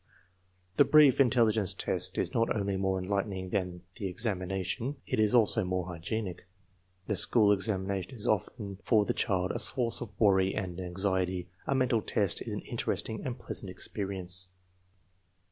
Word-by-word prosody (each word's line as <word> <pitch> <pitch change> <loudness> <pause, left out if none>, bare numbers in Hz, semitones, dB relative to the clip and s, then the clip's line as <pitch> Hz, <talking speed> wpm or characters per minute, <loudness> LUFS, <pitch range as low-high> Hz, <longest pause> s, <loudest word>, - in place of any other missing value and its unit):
The - - +8
brief 150 -3 +5
intelligence 115 -6 +2
test - - -1
is - - -1
not 115 0 +1
only 100 -2 -1
more 95 0 0
enlightening 95 0 -3
than 90 -3 -3
the 100 - -3
examination; 95 +5 -2
it - - -2
is 110 +2 +3
also 110 -2 +4
more 90 0 -2
hygienic. 90 +2 -5 0.6
The 105 - -1
school 105 +2 +6
examination 95 +1 -1
is 105 - -5
often 100 -1 -2
for 110 -4 +3
the - - 0
child 90 -2 0
a - - -3
source 120 -3 +1
of 105 -4 -9
worry 95 -3 +3
and 95 -3 -4
anxiety; 90 -1 -1 0.2
the 135 - +1
mental 125 -4 +1
test 100 -4 0
is - - -5
an - - -4
interesting 110 - -3
and 125 -1 -4
pleasant 100 -5 -4
experience. 90 -1 -2
100 Hz, 155 wpm, -30 LUFS, 95-110 Hz, 0.6 s, The